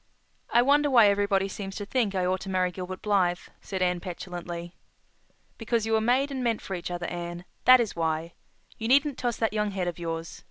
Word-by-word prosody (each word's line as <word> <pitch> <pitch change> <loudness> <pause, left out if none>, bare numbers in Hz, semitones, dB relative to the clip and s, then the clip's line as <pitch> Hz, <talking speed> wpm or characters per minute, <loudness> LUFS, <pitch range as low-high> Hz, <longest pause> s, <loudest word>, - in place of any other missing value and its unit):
"I 240 - +5
wonder 290 +2 +4
why 235 -6 +7
everybody 200 -1 +1
seems 195 0 -6
to 205 - -5
think 215 -3 0
I 185 -1 +1
ought 185 +1 0
to 195 - -7
marry 185 -1 +1
Gilbert 185 +1 -7
Blythe," 185 -4 +2 0.2
said 190 -2 -3
Anne 180 -1 +1
petulantly. 175 -1 -6 0.9
"Because 225 -1 0
you 225 - -1
were 220 - +3
made 255 +5 +2
and 260 -2 -3
meant 230 -3 +1
for 195 - -5
each 175 -1 -4
other, 175 0 -4
Anne—that 175 +8 +2
is 230 -3 -1
why. 165 0 -1 0.5
You 225 - -2
needn't 280 +2 +3
toss 240 -2 -1
that 225 -1 0
young 210 -1 0
head 190 -3 -2
of 175 0 -4
yours. 165 -1 -5
195 Hz, 205 wpm, -27 LUFS, 175-230 Hz, 0.9 s, why